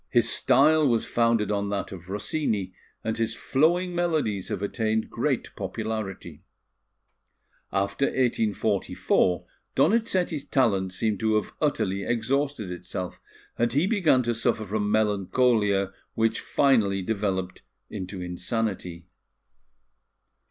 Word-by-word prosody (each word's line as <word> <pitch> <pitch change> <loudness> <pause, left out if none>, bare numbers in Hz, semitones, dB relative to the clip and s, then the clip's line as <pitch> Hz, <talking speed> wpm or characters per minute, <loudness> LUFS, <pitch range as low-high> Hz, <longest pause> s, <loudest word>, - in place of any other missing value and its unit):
His - - +3
style 150 +3 +4
was 115 -3 +2
founded 115 -2 +1
on 100 0 -1
that 100 -1 -3
of 90 -1 -10
Rossini, 105 -2 -2 0.3
and 110 0 -1
his 115 0 -1
flowing 175 +9 +1
melodies 155 - 0
have 100 - -3
attained 110 +1 -1
great - - -1
popularity. 110 -4 -5 1.3
After 100 +7 0
1844, 110 -7 +1 0.3
Donizetti's 185 -7 +2
talent 100 -8 +1
seemed 105 +2 -1
to 110 0 +1
have 105 - -1
utterly 110 -10 0
exhausted 120 -1 -1
itself, 90 +1 -6 0.4
and 120 0 +1
he 145 +6 +3
began 180 - +3
to 120 0 0
suffer 115 -1 0
from 105 +1 -1
melancholia, 105 -1 +2 0.2
which 115 0 +1
finally 105 -9 +2
developed 95 -3 -2 0.3
into 95 -2 -6
insanity. 90 -2 -3
110 Hz, 110 wpm, -26 LUFS, 100-130 Hz, 1.3 s, style